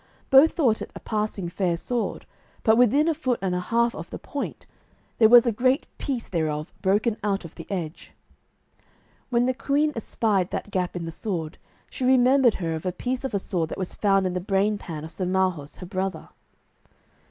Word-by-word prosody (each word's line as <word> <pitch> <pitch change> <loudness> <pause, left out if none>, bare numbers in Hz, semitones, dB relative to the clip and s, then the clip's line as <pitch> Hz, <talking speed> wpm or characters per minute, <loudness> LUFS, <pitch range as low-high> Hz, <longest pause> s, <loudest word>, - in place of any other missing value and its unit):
Both 270 +4 +7
thought 250 -10 +2
it - - -5
a - - -6
passing 210 -4 -2
fair 175 -1 -1
sword, 240 +6 -3 0.4
but 220 - +5
within 250 +6 +4
a 330 - +3
foot 260 -6 -1
and 190 -2 -1
a 180 - 0
half 235 +5 +1
of - - -8
the - - -6
point - - -6 0.5
there 220 -2 +7
was 240 +1 +8
a 235 - +2
great 255 +6 +1
piece 255 -5 -3
thereof 155 -3 -2
broken 210 +4 +1
out 200 -3 -1
of 165 - -10
the 165 - -11
edge. 175 -4 -5 1.2
When 240 -1 +2
the 255 - +1
queen 285 +5 +1
espied 210 -4 0
that 205 - -5
gap 180 -2 -1
in 170 -1 -4
the 165 - -5
sword, 165 -4 -4 0.3
she - - -6
remembered 255 -1 +5
her 165 -3 -2
of 160 +3 -4
a - - +1
piece 250 +8 -3
of 265 -6 -3
a - - +3
sword 175 -4 -2
that - - -6
was 185 -2 -4
found 195 -2 +2
in 185 - -1
the 180 - -1
brain 200 +2 +1
pan 155 -3 -7
of 160 - -7
Sir 185 0 -3
Marhaus, 185 -6 0
her 180 - -9
brother. 190 +1 -4
200 Hz, 200 wpm, -25 LUFS, 180-245 Hz, 1.2 s, was